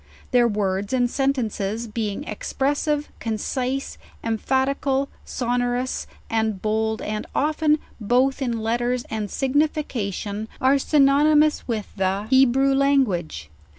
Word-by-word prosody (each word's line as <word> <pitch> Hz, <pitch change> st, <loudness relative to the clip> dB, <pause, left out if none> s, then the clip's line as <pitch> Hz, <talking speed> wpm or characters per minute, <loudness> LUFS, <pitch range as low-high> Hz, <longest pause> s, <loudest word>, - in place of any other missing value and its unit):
Their 245 Hz, -2 st, +5 dB
words 200 Hz, -1 st, -1 dB
and 245 Hz, -1 st, +3 dB
sentences 235 Hz, -5 st, -1 dB
being 215 Hz, -2 st, -3 dB
expressive, 290 Hz, +6 st, -1 dB
concise, 250 Hz, +4 st, -3 dB, 0.2 s
em 225 Hz, -1 st, -1 dB
phatical. 270 Hz, +1 st, 0 dB, 0.2 s
sonorous, 245 Hz, +1 st, -1 dB, 0.2 s
and 220 Hz, -3 st, 0 dB
bold, 220 Hz, +1 st, -1 dB
and 215 Hz, 0 st, -3 dB
often, 305 Hz, +1 st, +2 dB, 0.2 s
both 255 Hz, +6 st, +2 dB
in 235 Hz, -4 st, -1 dB
letters 240 Hz, +2 st, 0 dB
and 215 Hz, -2 st, -2 dB
signification, 250 Hz, -, -1 dB
are 270 Hz, +2 st, +4 dB
synonymous 300 Hz, +2 st, +4 dB
with 220 Hz, -4 st, -3 dB
the 195 Hz, +2 st, 0 dB
Hebrew 265 Hz, +1 st, +4 dB
language. 255 Hz, -, +1 dB
245 Hz, 110 wpm, -23 LUFS, 215-275 Hz, 0.2 s, Their